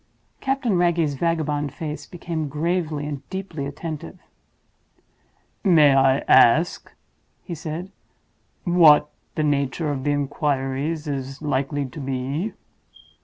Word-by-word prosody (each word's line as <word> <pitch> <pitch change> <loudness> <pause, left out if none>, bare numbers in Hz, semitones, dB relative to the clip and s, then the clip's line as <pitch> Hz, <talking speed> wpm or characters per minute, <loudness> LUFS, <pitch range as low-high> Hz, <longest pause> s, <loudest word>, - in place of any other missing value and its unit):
Captain 265 -8 0
Wragge's 170 -4 +2
vagabond 150 -2 -1
face 155 -1 -6
became 165 -3 -4
gravely 155 0 -1
and 145 -2 -5
deeply 185 -7 -4
attentive. 145 - -6 1.5
"May 155 -7 +6
I 135 0 +4
ask," 155 +9 +4 0.5
he 175 - -6
said, 165 +4 -6 0.7
"what 160 -5 +6 0.2
the 155 - 0
nature 145 +1 0
of 135 -2 -3
the 145 - 0
inquiries 145 +2 -1
is 135 -1 -4
likely 140 0 -1
to 145 +4 -9
be?" 135 +8 -3
150 Hz, 110 wpm, -23 LUFS, 140-170 Hz, 1.5 s, May